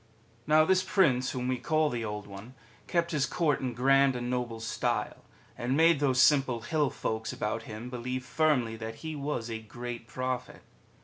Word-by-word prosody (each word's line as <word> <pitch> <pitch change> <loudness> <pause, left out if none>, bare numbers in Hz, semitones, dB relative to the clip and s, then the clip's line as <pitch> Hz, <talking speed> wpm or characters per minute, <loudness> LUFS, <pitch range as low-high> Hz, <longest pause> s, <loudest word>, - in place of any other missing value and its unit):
Now 155 +1 +5
this 185 +2 +3
Prince 135 -11 +2
whom 125 -1 -3
we 130 -1 -1
call 155 -2 +1
the 120 -2 -3
Old 105 -1 -4
One 100 +6 -11 0.3
kept 170 0 0
his 150 -3 +1
Court 155 -5 +1
in 125 -3 -3
grand 135 +1 +4
and 120 0 -3
noble 120 -2 -2
style, 110 0 -2 0.3
and 125 +3 -1
made 165 -2 +5
those 130 -3 +2
simple 135 -4 +4
hill 145 +5 +1
folks 110 -2 -3
about 105 +2 -2
him 110 +4 -7
believe 125 +1 -4
firmly 140 -6 +1
that 110 0 -6
he 160 -1 -3
was 140 -5 -3
a 115 -1 -4
great 120 +1 -7
Prophet. 130 -1 -4
125 Hz, 180 wpm, -29 LUFS, 115-150 Hz, 0.3 s, Now